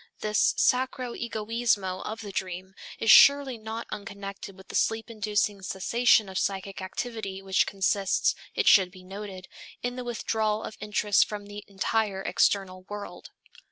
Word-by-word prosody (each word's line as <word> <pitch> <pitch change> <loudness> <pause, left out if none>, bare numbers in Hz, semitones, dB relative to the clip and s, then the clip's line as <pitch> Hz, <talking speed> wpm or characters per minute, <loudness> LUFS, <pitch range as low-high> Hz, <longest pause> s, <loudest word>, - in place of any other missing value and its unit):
This 210 0 +2
sacro 250 -1 +1
egoismo 220 -4 -1
of 220 +1 -5
the 205 -2 -7
dream 185 0 -5 0.2
is 225 - +4
surely 280 -4 +7
not 220 +1 -6
unconnected 200 -1 -7
with 190 - -16
the - - -7
sleep 225 +1 0
inducing 210 -2 -1
cessation 215 +4 +2
of 190 0 -3
psychic 195 0 -3
activity 195 0 -5
which 190 -1 +2
consists, 195 0 +1 0.2
it 455 - 0
should 190 -3 +7
be 185 0 -15
noted, 195 -1 -8 0.4
in 245 +1 -3
the 250 - -4
withdrawal 220 -2 -1
of 215 - -7
interest 210 -1 +2
from 205 -1 -6
the 205 0 -9
entire 200 0 -1
external 190 -2 +1
world. 205 0 -8
205 Hz, 150 wpm, -27 LUFS, 195-225 Hz, 0.4 s, surely